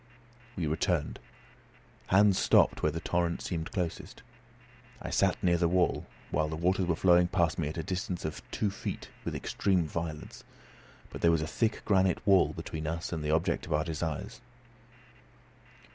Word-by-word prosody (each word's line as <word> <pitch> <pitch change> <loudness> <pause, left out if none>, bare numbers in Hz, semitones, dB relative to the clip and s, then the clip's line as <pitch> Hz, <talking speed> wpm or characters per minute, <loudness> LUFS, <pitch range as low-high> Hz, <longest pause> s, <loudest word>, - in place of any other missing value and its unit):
We 90 - -2
returned. 80 0 -1 0.9
Hans 100 0 +4
stopped - - +4
where 75 - +2
the 85 - -4
torrent 85 0 -1
seemed 80 -3 -4
closest. 90 -4 -4 0.8
I - - -6
sat - - +2
near 85 -1 +3
the 85 - +3
wall, 90 +1 +1 0.2
while 75 +1 +1
the 80 - -3
waters 90 +3 +1
were 85 - +2
flowing 90 +1 +4
past 85 -3 +1
me 75 - 0
at 75 - -5
a 80 - -2
distance 90 -1 -3
of 80 - -4
two 105 - -1
feet 95 - -6
with - - -4
extreme 95 -3 0
violence. 80 -1 -6 0.7
But - - -8
there 85 - +5
was 80 -2 +2
a - - -1
thick 110 +7 -1
granite 95 -1 +2
wall 95 -3 +5
between 80 -1 -6
us 85 +2 -3
and 80 -2 -3
the 75 - -2
object 80 +2 0
of - - -2
our 75 +1 +2
desires. 80 -2 -4
85 Hz, 170 wpm, -30 LUFS, 80-90 Hz, 0.9 s, there